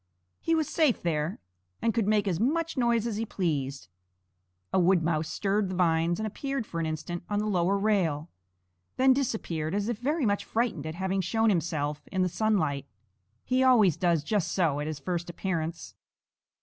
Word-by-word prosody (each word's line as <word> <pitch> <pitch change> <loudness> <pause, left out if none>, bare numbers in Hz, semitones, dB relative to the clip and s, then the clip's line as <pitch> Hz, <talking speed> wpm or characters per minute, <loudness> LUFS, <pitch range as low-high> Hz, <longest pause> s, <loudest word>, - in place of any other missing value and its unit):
He 330 - +1
was 315 -3 +1
safe 310 -7 +2
there, 160 0 -1 0.4
and 230 - +1
could 225 -4 0
make 210 -1 +2
as 175 -3 0
much 325 +8 0
noise 235 -3 +2
as 225 -3 -2
he 225 - -1
pleased. 140 - -2 0.9
A - - +4
wood 180 -1 +4
mouse 160 -1 0
stirred 200 -1 0
the 185 - -3
vines 170 0 +2
and 220 - -2
appeared 270 +3 -3
for 170 - -5
an 165 - -1
instant 160 +2 -4
on 205 - 0
the 210 - 0
lower 190 -1 +2
rail, 180 -8 +1 0.7
then 260 0 +6
disappeared 195 - -2
as 205 +2 -1
if 230 -3 -2
very 290 +3 0
much 205 -1 +1
frightened 220 -10 -1
at 155 - -5
having 190 +1 -1
shown 225 +5 +2
himself 150 -4 -1
in 185 -1 +1
the 180 - +1
sunlight. 160 -9 0 0.6
He 255 +1 +1
always 225 - +5
does 170 -4 +1
just 200 +1 0
so 160 -6 +1
at 150 - -3
his 155 -1 -3
first 175 +3 -3
appearance. 170 -2 -3
190 Hz, 185 wpm, -28 LUFS, 165-220 Hz, 0.9 s, then